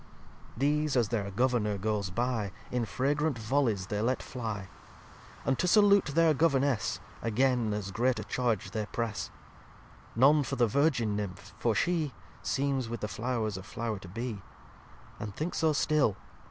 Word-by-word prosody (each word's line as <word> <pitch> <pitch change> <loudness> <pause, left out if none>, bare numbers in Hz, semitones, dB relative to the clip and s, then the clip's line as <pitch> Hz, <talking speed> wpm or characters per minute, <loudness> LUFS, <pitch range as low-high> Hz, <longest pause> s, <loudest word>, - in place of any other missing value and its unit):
xxxviii - - -22
These, 150 +2 +1
as 115 -4 +2
their 105 -4 -1
Governour 105 -1 +1
goes 105 -1 -1
by, 115 0 -1 0.2
In 125 -2 0
fragrant 145 +4 0
Vollyes 110 -4 0
they 105 0 -1
let 125 +3 0
fly; 110 -6 -5 0.8
And 135 -1 +1
to 180 - +2
salute 200 0 +6
their 160 +2 +4
Governess 135 - +1 0.2
Again 120 0 +2
as 105 -2 -3
great 125 +5 +1
a - - -3
charge 115 -7 -1
they 105 -1 -2
press: 110 -7 -3 0.9
None 140 +6 +6
for 130 - -2
the 120 - +4
Virgin 120 -3 +2
Nymph; 100 -3 -5
for 115 -2 +1
She 160 - 0 0.3
Seems 135 -3 0
with 120 -1 -5
the 105 - -1
Flow'rs 110 0 -2
a - - -6
Flow'r 110 +1 -4
to 95 - -11
be. 110 +2 -5 0.8
And 105 -2 -6
think 160 +4 -2
so 160 -1 +2
still! 150 -7 +2
120 Hz, 160 wpm, -30 LUFS, 105-140 Hz, 0.9 s, salute